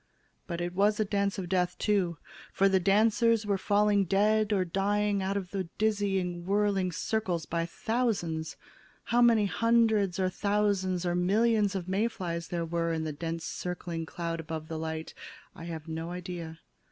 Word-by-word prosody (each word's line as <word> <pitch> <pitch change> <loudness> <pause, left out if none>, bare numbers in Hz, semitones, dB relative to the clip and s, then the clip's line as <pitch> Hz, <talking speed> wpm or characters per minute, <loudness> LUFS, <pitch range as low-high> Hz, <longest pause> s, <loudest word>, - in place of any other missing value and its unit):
But 170 -2 -3
it 175 0 -3
was 205 +3 +2
a 215 - +2
dance 200 -1 0
of 185 -2 -4
death, 180 -1 0
too, 190 -6 +1 0.3
for 195 - +3
the 190 -1 +3
dancers 220 +3 +3
were 200 -2 0
falling 205 0 +3
dead 210 +3 +2
or 190 -3 +2
dying 200 +2 0
out 195 +1 -1
of 185 -3 -5
the 195 -2 -2
dizzying 195 -5 0
whirly 200 -1 +1
circles 180 -2 -2
by 170 0 -2
thousands. 190 -7 -2 0.5
How 240 +1 +2
many 230 -3 +5
hundreds 220 -4 +2
or 185 - +2
thousands 195 -2 0
or 175 - +1
millions 205 +3 +2
of 185 -2 -3
May 195 +5 +1
flies 170 -7 -4
there 170 -1 -2
were 165 0 -1
in 160 -1 -1
the 155 -1 -3
dense 165 +2 -4
circling 175 -2 -4
cloud 170 -1 -4
about 160 -1 -6
the 160 -1 -4
light, 160 0 -4 0.4
I 165 - -10
have 165 -2 -6
no 160 +1 -4
idea. 175 -2 -6
190 Hz, 170 wpm, -29 LUFS, 170-205 Hz, 0.5 s, many